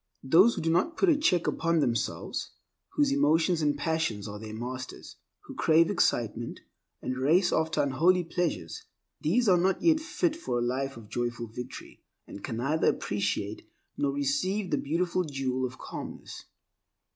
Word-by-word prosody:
Those 180 Hz, -, +5 dB
who -, -, -3 dB
do 165 Hz, -, +2 dB
not 185 Hz, -, +1 dB
put 385 Hz, -, +3 dB
a 320 Hz, -, +5 dB
check 185 Hz, -, +2 dB
upon 165 Hz, 0 st, +1 dB
themselves, 120 Hz, -5 st, -2 dB, 0.4 s
whose 290 Hz, -2 st, +2 dB
emotions 165 Hz, -, +3 dB
and 145 Hz, -1 st, +1 dB
passions 145 Hz, -9 st, -1 dB
are 105 Hz, 0 st, -7 dB
their 110 Hz, 0 st, -8 dB
masters, 130 Hz, +3 st, -7 dB, 0.2 s
who -, -, -11 dB
crave 165 Hz, +3 st, +4 dB
excitement 120 Hz, -, 0 dB, 0.4 s
and 130 Hz, 0 st, -3 dB
race 170 Hz, +7 st, +3 dB
after 160 Hz, -1 st, +1 dB
unholy 170 Hz, +7 st, +3 dB
pleasures— 165 Hz, -, -3 dB, 0.4 s
these 220 Hz, +10 st, +2 dB
are 180 Hz, -3 st, +5 dB
not 185 Hz, +1 st, +2 dB
yet 320 Hz, -2 st, +5 dB
fit 325 Hz, 0 st, -1 dB
for 320 Hz, -, -3 dB
a -, -, 0 dB
life 135 Hz, +2 st, -2 dB
of 110 Hz, -2 st, -11 dB
joyful 120 Hz, +2 st, -3 dB
victory, 120 Hz, +2 st, -9 dB, 0.2 s
and 100 Hz, -, -10 dB
can 115 Hz, -, -4 dB
neither 140 Hz, +7 st, +1 dB
appreciate 105 Hz, 0 st, -1 dB, 0.3 s
nor 140 Hz, -, 0 dB
receive 145 Hz, +8 st, -1 dB
the 145 Hz, -, +2 dB
beautiful 175 Hz, +5 st, 0 dB
jewel 130 Hz, -4 st, -2 dB
of 130 Hz, +1 st, -12 dB
calmness. -, -, -8 dB
150 Hz, 160 wpm, -28 LUFS, 125-180 Hz, 0.4 s, Those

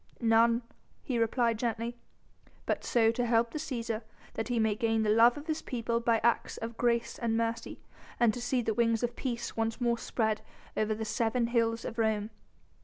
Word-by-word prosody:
"None," 230 Hz, +1 st, +4 dB, 0.4 s
he 245 Hz, -3 st, -1 dB
replied 230 Hz, 0 st, +1 dB
gently, 235 Hz, 0 st, -2 dB, 0.7 s
"but -, -, -1 dB
so 225 Hz, -2 st, +3 dB
to 245 Hz, +2 st, -1 dB
help 230 Hz, 0 st, +2 dB
the 305 Hz, -, -4 dB
Cæsar, 235 Hz, -7 st, -3 dB, 0.3 s
that 225 Hz, -, -3 dB
he 245 Hz, -1 st, -1 dB
may 220 Hz, -1 st, +2 dB
gain 225 Hz, 0 st, +1 dB
the 210 Hz, -, +2 dB
love 230 Hz, +3 st, +6 dB
of 290 Hz, -, -8 dB
his 315 Hz, -1 st, -2 dB
people 235 Hz, -1 st, -2 dB
by 230 Hz, -1 st, +2 dB
acts 235 Hz, -1 st, +1 dB
of 230 Hz, 0 st, -5 dB
grace 235 Hz, -1 st, 0 dB
and 225 Hz, -1 st, 0 dB
mercy, 230 Hz, 0 st, -2 dB, 0.4 s
and 235 Hz, -3 st, +4 dB
to 245 Hz, -, -5 dB
see 245 Hz, 0 st, 0 dB
the 220 Hz, -, 0 dB
wings 230 Hz, 0 st, +1 dB
of 240 Hz, 0 st, -1 dB
peace 240 Hz, -3 st, -4 dB
once 225 Hz, +1 st, -1 dB
more 235 Hz, -1 st, +1 dB
spread 220 Hz, -2 st, -1 dB, 0.3 s
over 215 Hz, 0 st, 0 dB
the 220 Hz, +1 st, -4 dB
seven 230 Hz, +2 st, 0 dB
hills 230 Hz, -1 st, +1 dB
of 230 Hz, -1 st, -5 dB
Rome." 220 Hz, -1 st, 0 dB
230 Hz, 190 wpm, -30 LUFS, 225-240 Hz, 0.7 s, love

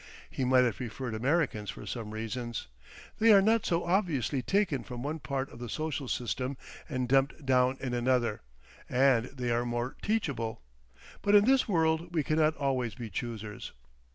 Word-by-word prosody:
He 135 Hz, -, -2 dB
might 130 Hz, 0 st, +5 dB
have 120 Hz, -5 st, 0 dB
preferred 120 Hz, 0 st, -5 dB
Americans 125 Hz, -3 st, 0 dB
for -, -, -7 dB
some 115 Hz, -4 st, -5 dB
reasons; 115 Hz, +2 st, -4 dB, 0.5 s
they 225 Hz, +1 st, +6 dB
are 200 Hz, -, +9 dB
not 220 Hz, +3 st, +3 dB
so 170 Hz, 0 st, +1 dB
obviously 165 Hz, -, +1 dB
taken 160 Hz, -, +1 dB
from 125 Hz, 0 st, -7 dB
one 155 Hz, +3 st, -3 dB
part 135 Hz, -1 st, -3 dB
of 120 Hz, -, -12 dB
the 120 Hz, -1 st, -6 dB
social 155 Hz, 0 st, -3 dB
system 125 Hz, +3 st, -2 dB, 0.3 s
and 130 Hz, -3 st, -1 dB
dumped 135 Hz, +3 st, +2 dB
down 130 Hz, 0 st, +3 dB
in 130 Hz, -2 st, -3 dB
another, 120 Hz, -3 st, +1 dB, 0.5 s
and 125 Hz, -2 st, +4 dB
they 125 Hz, -2 st, -4 dB
are 120 Hz, +1 st, +1 dB
more 120 Hz, +1 st, -2 dB
teachable; 135 Hz, -, -2 dB, 0.6 s
but 205 Hz, 0 st, +3 dB
in 205 Hz, 0 st, +7 dB
this 265 Hz, +1 st, +4 dB
world 165 Hz, -1 st, +1 dB
we 155 Hz, -, +2 dB
cannot 155 Hz, +2 st, +2 dB
always 130 Hz, -6 st, -1 dB
be 115 Hz, -2 st, -7 dB
choosers. 110 Hz, -3 st, -5 dB
130 Hz, 170 wpm, -30 LUFS, 120-160 Hz, 0.6 s, are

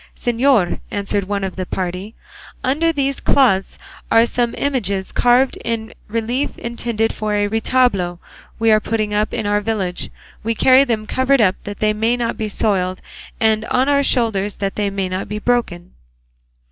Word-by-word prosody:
"Señor," 240 Hz, -5 st, +2 dB
answered 200 Hz, -1 st, -1 dB
one 200 Hz, 0 st, -2 dB
of 190 Hz, -1 st, -3 dB
the 185 Hz, -, -3 dB
party, 185 Hz, +4 st, -4 dB, 0.5 s
"under 310 Hz, +6 st, +2 dB
these 275 Hz, -3 st, -1 dB
cloths 225 Hz, -9 st, +2 dB, 0.3 s
are 225 Hz, +1 st, +6 dB
some 240 Hz, 0 st, -1 dB
images 200 Hz, -9 st, -1 dB
carved 245 Hz, +2 st, +3 dB
in 225 Hz, -1 st, -3 dB
relief 230 Hz, +5 st, -2 dB
intended 235 Hz, -1 st, -2 dB
for 215 Hz, -1 st, -2 dB
a 205 Hz, 0 st, +1 dB
retablo 220 Hz, -5 st, +1 dB, 0.4 s
we 225 Hz, 0 st, +3 dB
are 215 Hz, -, +5 dB
putting 215 Hz, -1 st, -2 dB
up 210 Hz, +1 st, 0 dB
in 220 Hz, -3 st, -3 dB
our 205 Hz, 0 st, +1 dB
village; 200 Hz, -5 st, -2 dB, 0.3 s
we 230 Hz, +1 st, -1 dB
carry 260 Hz, +4 st, +6 dB
them 225 Hz, -5 st, -1 dB
covered 260 Hz, +4 st, +2 dB
up 195 Hz, -4 st, +4 dB
that 205 Hz, -1 st, -7 dB
they 215 Hz, 0 st, +3 dB
may 225 Hz, +3 st, +1 dB
not 235 Hz, -1 st, -1 dB
be 215 Hz, -1 st, -3 dB
soiled, 185 Hz, -3 st, 0 dB, 0.4 s
and 220 Hz, -1 st, +2 dB
on 255 Hz, +2 st, +1 dB
our 285 Hz, -1 st, +3 dB
shoulders 220 Hz, -7 st, +1 dB
that 195 Hz, -1 st, -3 dB
they 205 Hz, -1 st, 0 dB
may 195 Hz, -1 st, -2 dB
not 185 Hz, +1 st, -4 dB
be 210 Hz, -, -3 dB
broken." 210 Hz, -7 st, -1 dB
220 Hz, 170 wpm, -19 LUFS, 200-245 Hz, 0.5 s, are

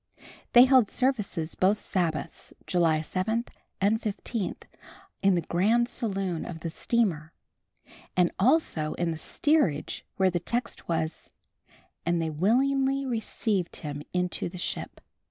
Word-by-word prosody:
They 245 Hz, +1 st, +9 dB
held 255 Hz, -5 st, +5 dB
services 210 Hz, -11 st, -1 dB
both 200 Hz, +3 st, +2 dB
Sabbaths, 165 Hz, -8 st, -3 dB
July 165 Hz, -4 st, +2 dB
7 220 Hz, +8 st, -1 dB, 0.3 s
and 210 Hz, +4 st, +2 dB
15, 215 Hz, -1 st, -3 dB, 0.7 s
in 195 Hz, -1 st, +4 dB
the 175 Hz, -, +1 dB
grand 220 Hz, +9 st, +2 dB
saloon 195 Hz, -9 st, -2 dB
of 165 Hz, -2 st, -7 dB
the 165 Hz, -, -4 dB
steamer, 165 Hz, -7 st, 0 dB, 0.8 s
and 180 Hz, -1 st, +4 dB
also 200 Hz, -, +2 dB
in 170 Hz, -1 st, -1 dB
the 160 Hz, -, -4 dB
steerage 290 Hz, -, +1 dB
where 190 Hz, -1 st, +3 dB
the 175 Hz, -, 0 dB
text 235 Hz, +7 st, -3 dB
was 160 Hz, -1 st, -2 dB, 0.7 s
"And 170 Hz, 0 st, +1 dB
they 160 Hz, -1 st, -1 dB
willingly 270 Hz, -, +2 dB
received 220 Hz, -6 st, -1 dB
him 145 Hz, -2 st, -5 dB
into 180 Hz, -1 st, -1 dB
the 180 Hz, -, -9 dB
ship." 180 Hz, -, -4 dB
190 Hz, 130 wpm, -27 LUFS, 170-235 Hz, 0.8 s, They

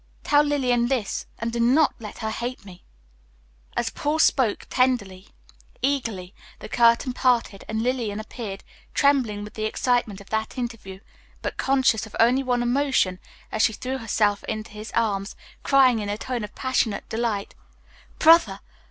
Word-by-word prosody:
Tell 290 Hz, 0 st, +4 dB
Lillian 250 Hz, -5 st, +1 dB
this, 245 Hz, -6 st, -2 dB
and 230 Hz, +1 st, -3 dB
do 235 Hz, -, -2 dB
not 265 Hz, +6 st, +4 dB
let 215 Hz, -3 st, -9 dB
her 220 Hz, -, -1 dB
hate 240 Hz, 0 st, -5 dB
me." 180 Hz, -2 st, -13 dB, 0.9 s
As 225 Hz, -1 st, 0 dB
Paul 295 Hz, +2 st, -1 dB
spoke, 260 Hz, -8 st, +2 dB
tenderly, 210 Hz, -7 st, 0 dB, 0.6 s
eagerly, 230 Hz, -10 st, -1 dB, 0.2 s
the -, -, -9 dB
curtain 235 Hz, +2 st, +3 dB
parted, 240 Hz, -6 st, +1 dB
and 220 Hz, +1 st, -2 dB
Lillian 235 Hz, -5 st, -1 dB
appeared, 215 Hz, -2 st, -7 dB, 0.3 s
trembling 255 Hz, -8 st, +2 dB
with 210 Hz, -, -9 dB
the 215 Hz, -, -3 dB
excitement 225 Hz, -2 st, 0 dB
of 200 Hz, -, -15 dB
that 220 Hz, +3 st, -2 dB
interview, 230 Hz, -6 st, -6 dB, 0.4 s
but -, -, -3 dB
conscious 260 Hz, -5 st, +2 dB
of 215 Hz, -, -12 dB
only 245 Hz, +4 st, +4 dB
one 245 Hz, -2 st, 0 dB
emotion 245 Hz, -7 st, +1 dB, 0.3 s
as 220 Hz, -, -1 dB
she 220 Hz, -, +3 dB
threw 260 Hz, +5 st, -4 dB
herself 210 Hz, -2 st, +1 dB
into 215 Hz, 0 st, -5 dB
his 215 Hz, +1 st, -8 dB
arms, 205 Hz, -3 st, 0 dB, 0.3 s
crying 260 Hz, -4 st, +4 dB
in 205 Hz, -1 st, -4 dB
a 205 Hz, -, -2 dB
tone 245 Hz, 0 st, -4 dB
of 210 Hz, -, -8 dB
passionate 255 Hz, -5 st, -1 dB
delight, 220 Hz, -3 st, -2 dB, 0.6 s
"Brother! 330 Hz, +2 st, +5 dB
230 Hz, 155 wpm, -24 LUFS, 210-255 Hz, 0.9 s, Brother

